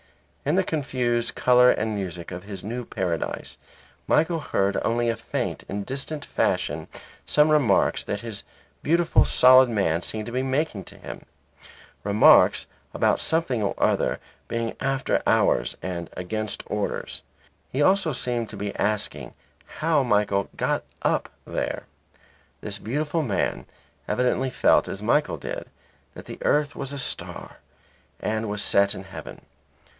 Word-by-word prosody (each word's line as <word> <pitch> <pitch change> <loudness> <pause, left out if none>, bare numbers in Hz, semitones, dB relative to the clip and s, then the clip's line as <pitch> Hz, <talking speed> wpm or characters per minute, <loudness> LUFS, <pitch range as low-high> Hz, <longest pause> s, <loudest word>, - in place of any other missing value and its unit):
In 150 +4 +1
the 190 - +3
confused 125 -7 -1
colour 125 0 +5
and 110 -2 +1
music 90 -4 -5
of 90 0 -6
his 100 -1 -7
new 120 +4 -4
paradise, 90 -8 -3 0.5
Michael 165 +1 +2
heard 100 -9 0
only 120 +1 +1
in - - +2
a - - -6
faint 115 - -4
and 100 0 -3
distant 140 +3 -5
fashion - - -1 0.4
some 150 +1 +4
remarks 150 -6 +3
that 100 - -3
this 115 -4 -6 0.4
beautiful 170 +2 +3
solid 130 0 +6
man 95 -7 +1
seemed 110 +4 -3
to 120 - -6
be 130 +2 0
making 130 - -1
to - - -12
him; - - -9 0.8
remarks 105 +1 +6 0.3
about - - +2
something 160 -8 +1
or 100 - -1
other - - +1 0.3
being 115 -1 -2
after 135 0 0
hours - - +2
and 85 -2 -4
against 105 +3 -3
orders. - - -3 0.5
He 140 +3 +1
also 190 -1 +3
seemed 120 -4 -2
to - - -8
be 100 0 -4
asking 105 0 -1 0.4
how 155 -2 +2
Michael 105 -5 +1
"got - - 0 0.2
up" - - +1 0.2
there. - - -3 0.8
This - - -3
beautiful 150 +7 -1
man 115 -10 -1 0.4
evidently 125 +1 +1
felt - - +3
as 100 +2 -6
Michael 150 +7 +2
did - - -5 0.5
that - - -10
the - - -9
earth 145 0 +1
was 135 - -5
a 140 - -5
star 130 - -5 0.6
and 110 0 -2
was 105 0 -1
set 100 0 +3
in 95 - -7
heaven. 95 0 -10
120 Hz, 145 wpm, -25 LUFS, 100-140 Hz, 0.8 s, solid